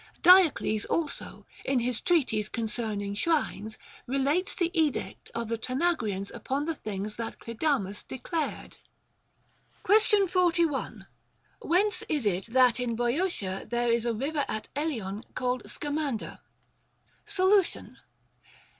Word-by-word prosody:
Diocles 335 - +6
also, 325 -3 -3 0.2
in 270 - +1
his 245 -1 0
Treatise 235 - +1
concerning 215 -3 -3
Shrines, 220 -4 -1 0.3
relates 280 +8 0
the 345 -2 0
edict 310 -4 -1
of 230 -1 -2
the 230 0 -2
Tana 270 +10 +1
grians 200 -7 -4
upon 280 +2 -2
the 330 - -1
things 210 -5 -5
that 230 -1 -5
Clidamus 230 -4 -1
declared. 310 +4 -4 1.0
Question 420 -1 +4
41. 340 -5 +1 0.6
Whence 370 +2 +1
is 295 -7 0
it 195 0 0
that 250 0 +4
in 240 -2 -1
Boeotia 240 - -1
there 240 0 +1
is 235 0 +1
a 235 - +1
river 285 +5 -1
at 215 - -4
Eleon 230 -9 -3
called 250 0 -2
Scamander? 290 -5 -3 0.8
Solution. 400 -2 +1
260 Hz, 120 wpm, -28 LUFS, 220-330 Hz, 1.0 s, Diocles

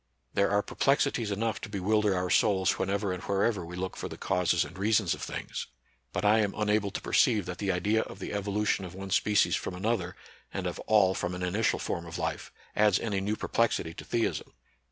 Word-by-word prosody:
There 100 - +3
are 105 0 +2
perplexities 135 -5 +1
enough 110 +1 -1
to 110 - -6
bewil 105 +2 +1
der 105 -2 +2
our 90 0 -1
souls 95 -3 +3
whenever 100 0 0
and 90 - -5
wherever 100 0 0
we 85 +1 -8
look 95 +1 -4
for - - -5
the - - -8
causes 90 -1 +1
and 85 - -11
reasons 100 -2 +2
of - - -8
things; - - -5 0.4
but - - -2
I 105 +2 +5
am 105 -2 +1
imable 105 -1 +1
to - - -3
perceive 110 -7 +3
that 90 -1 -6
the 100 -2 0
idea 105 +5 +1
of - - -8
the - - -6
evolu 100 +1 -1
tion 100 - +1
of 90 0 -8
one 95 0 -7
species 105 0 +3
from - - -4
another, 95 -2 -1 0.4
and - - -4
of - - -3
all 100 -4 +5
from 90 -1 -2
an 90 - -5
initial 100 +5 +1
form 85 0 -3
of 85 - -6
life, - - -3 0.2
adds 105 -1 +4
any 100 -4 -1
new 105 +2 -1
perplexity 110 -8 0
to - - -9
theism. 115 -1 -1
100 Hz, 215 wpm, -29 LUFS, 90-105 Hz, 0.4 s, I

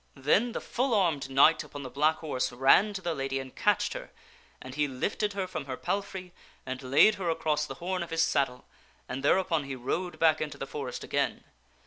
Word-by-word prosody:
Then 200 - +2
the - - -2
full 250 -1 0
armed 160 -9 +1
knight 140 +4 +5
upon 145 -1 -9
the 130 - -6
black 150 +4 +3
horse 145 -7 -2
ran 135 +12 +5
to 190 - -5
the 170 - -1
lady 135 -2 -2
and 130 -1 -7
catched - - +1
her, - - -7 0.5
and 130 - -9
he 145 +1 +1
lifted 200 +10 -2
her 195 -1 -2
from 180 -6 -5
her 130 -2 -5
palfrey 190 -3 -4 0.3
and 130 0 -5
laid 140 +11 +5
her 175 - 0
across 150 -2 0
the - - -7
horn 185 +1 -3
of 170 - -5
his 165 0 +2
saddle, 135 -5 0 0.4
and 130 +2 -4
thereupon 165 0 +2
he 135 -1 -5
rode 170 +8 -3
back 160 -1 +3
into 150 -2 -4
the - - -4
forest 135 -3 -6
again. - - -1
150 Hz, 205 wpm, -29 LUFS, 135-180 Hz, 0.5 s, knight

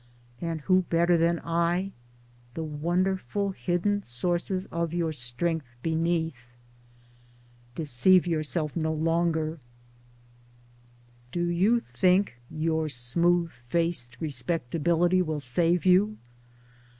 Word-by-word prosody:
(and 165 -2 -3
who 185 +4 +3
better 170 +1 +3
than 170 0 +2
I 170 +3 0 0.6
the 165 - -3
wonderful 180 +4 -1
hidden 190 +3 0
sources 175 +8 -1
of 170 0 -2
your 170 -2 0
strength 145 +3 -3 0.2
beneath?) 160 -5 -1 1.3
Deceive 165 +6 +4
yourself 155 -2 -1
no 160 -2 0
longer. 160 0 0 1.7
Do 175 - -1
you 190 +8 +3
think 180 - +1
your 160 0 -1
smooth 170 +7 +1
faced 125 0 -2
Respectability 165 +3 0
will 155 -4 -2
save 165 +7 +1
you 200 +4 +4
170 Hz, 95 wpm, -27 LUFS, 155-175 Hz, 1.7 s, Deceive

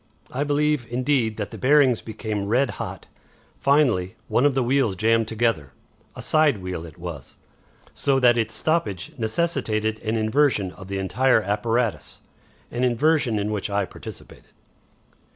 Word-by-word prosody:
I 135 +3 -1
believe, 145 -3 +1
indeed, 125 -3 0
that 105 -2 -4
the - - -8
bearings 135 -3 +4
became 110 -2 -4
red 125 +5 +2
hot. - - -6 0.5
Finally 125 -11 +2
one 140 - +4
of 140 - -1
the 135 - +2
wheels 125 -5 +1
jammed 115 +3 +2
together. 110 - -1 0.4
A - - -8
side 155 -5 +3
wheel 90 -3 -5
it 80 - -14
was, 85 -6 -8 0.6
so 135 -2 +1
that 120 -2 +5
its 110 -2 -1
stoppage 110 - -1
necessitated 110 -4 -1
an 110 0 -1
inversion 110 -3 +2
of 95 0 -12
the 100 0 -3
entire 110 +5 +2
apparatus, 115 +3 -1 0.5
an 120 +1 -2
inversion 130 -1 +2
in 105 +1 -1
which 105 -1 -3
I 100 0 0
participated." - - -12
115 Hz, 150 wpm, -23 LUFS, 105-135 Hz, 0.6 s, that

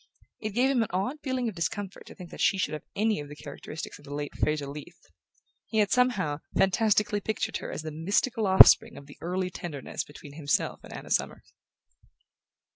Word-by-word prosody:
It 215 -2 -4
gave 260 +3 +4
him 255 -3 +2
an 225 - +1
odd 195 - -1
feeling 260 -3 -1
of 220 - -3
discomfort 190 +3 -4
to - - -11
think 180 -3 -11
that - - -7
she 195 - +4
should 185 - -1
have 155 - -4
any 215 -1 +1
of 145 -1 -7
the 145 - -8
characteristics 150 +1 -8
of 145 - -16
the 145 0 -6
late 145 -1 -4
Fraser 150 -1 0
Leath: 140 +1 -10 0.6
he 220 - -3
had, 210 -2 +3
somehow, 205 - +2 0.2
fantastically 210 +1 +3
pictured 220 +2 -2
her - - -6
as - - -5
the 155 - -5
mystical 200 - 0
offspring 190 0 +8
of 140 - -10
the 140 - -15
early 180 +2 -2
tenderness 165 -7 -5
between 145 -1 -12
himself 145 -2 0
and - - -12
Anna - - -8
Summers. - - -1
185 Hz, 200 wpm, -28 LUFS, 150-215 Hz, 0.6 s, offspring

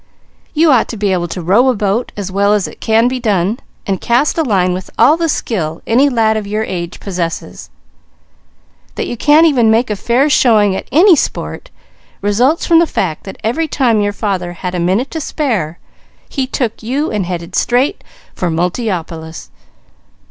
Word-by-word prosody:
You 315 0 +4
ought 250 -4 +3
to 230 - -6
be 205 -1 0
able 175 -1 -1
to 175 +1 -6
row 215 +10 +4
a 255 - +1
boat 205 +3 -1
as 195 -2 -4
well 200 +2 +2
as 205 - -1
it - - -13
can 225 +1 +3
be 255 0 -2
done, 210 -1 0 0.3
and 195 -2 -2
cast 240 +5 +1
a 330 - +1
line 190 - +1
with 185 0 -6
all 265 +7 +5
the 330 0 -1
skill 165 - -3
any 260 +5 +3
lad 225 -4 +2
of 210 -2 -4
your 215 +2 -1
age 175 -4 -5
possesses. 175 -4 -5 1.3
That - - -2
you - - -4
can't 295 +7 +4
make 325 - +5
even 225 -4 +4 0.2
a - - 0
fair 240 +8 +1
showing 215 -8 +3
at - - -5
any 345 +6 +6
sport, - - -3 0.5
results 245 +10 +1
from 330 -1 +5
the 335 - +3
fact 165 - -3
that 195 - -8
every 310 +9 0
time 240 -7 +1
your 205 0 0
father 190 -4 -3
had 180 +1 -5
a 180 - -2
minute 190 +10 0
to 320 - -4
spare 215 - -2 0.5
he 265 -2 -3
took 240 -4 -3
you 270 +7 -2
and 205 -5 -2
headed 170 -2 -5
straight 260 +9 +1 0.3
for 180 - -2
Multiopolis. 170 -2 -3
215 Hz, 185 wpm, -15 LUFS, 185-255 Hz, 1.3 s, any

